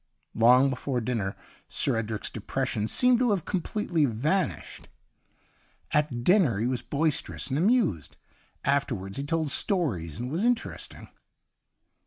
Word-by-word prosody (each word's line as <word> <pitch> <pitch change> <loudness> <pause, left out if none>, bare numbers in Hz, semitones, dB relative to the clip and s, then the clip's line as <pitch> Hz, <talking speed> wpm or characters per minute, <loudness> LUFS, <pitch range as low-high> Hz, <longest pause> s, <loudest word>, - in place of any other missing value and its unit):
Long 125 +4 +5
before 130 0 -2
dinner. 110 -5 -2 0.3
Sir - - +1
Edric's 110 -1 -3
depression 110 -1 -2
seemed 250 - +4
to 250 -1 +2
have 195 -6 0
com 190 - -1
pletely 170 -7 0
vanished. 150 - -2 1.0
At 145 -6 0
dinner 175 - +4
he 110 - -1
was 125 -1 -1
boisterous 145 0 -2
and 135 - -1
amused. 190 - +1 0.5
Afterwards 120 -9 -1
he - - -2
told 160 0 -1
stories 115 - 0
and 125 +2 -4
was 170 +7 -1
interesting 240 0 -2
140 Hz, 130 wpm, -27 LUFS, 115-175 Hz, 1.0 s, Long